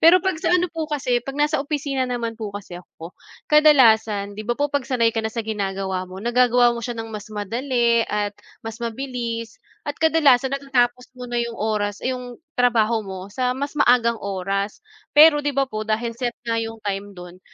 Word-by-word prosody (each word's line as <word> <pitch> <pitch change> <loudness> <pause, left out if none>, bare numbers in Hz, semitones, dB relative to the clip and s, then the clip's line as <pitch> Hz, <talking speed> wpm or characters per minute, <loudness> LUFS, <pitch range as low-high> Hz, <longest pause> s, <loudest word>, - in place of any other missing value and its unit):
Pero 345 +2 +6
'pag 375 -4 -1
sa 330 - 0
ano 355 - +1
po 320 -2 -4
kasi, 255 -5 0
'pag 275 +3 -7
nasa 295 0 +1
opisina 275 -3 -2
naman 235 -2 -4
po 215 - -3
kasi 180 -3 -9
ako, 170 0 -12 0.3
ka-dalasan 225 -9 +4
'di 205 - -8
ba 240 - 0
po 290 0 -1
'pag-sanay 255 -5 +1
ka 225 - -1
na 220 - -2
sa 230 0 -4
ginagawa 195 -3 -3
mo, 185 - -10
nagagawa 240 +2 +3
mo 235 - -5
siya 240 0 -5
ng 225 -1 -6
mas 210 0 -7
madali 235 +2 0
at 205 -1 -1 0.3
mas 225 +1 -7
mabilis. 235 -1 -4 0.2
At 290 -2 -4
kadalasan 285 -5 +4
natatapos 250 -2 0
mo 250 -1 -9
na 240 - -3
'yong 235 -1 -2
oras 210 -1 -1
'yong 250 0 -4 0.2
trabaho 235 -2 +3
mo 190 -1 -8
sa 250 +1 0
mas 280 +1 -3
maagang 240 -5 +3
oras. 195 - -3 0.3
Pero 300 0 +8
'di 290 -1 -2
ba 275 - +3
po 215 -5 -6
dahil 225 +2 -1
set 240 0 -3
nga 230 -1 0
'yong 225 0 -5
time 200 0 -4
do'n, 180 0 -11
235 Hz, 190 wpm, -22 LUFS, 215-265 Hz, 0.3 s, Pero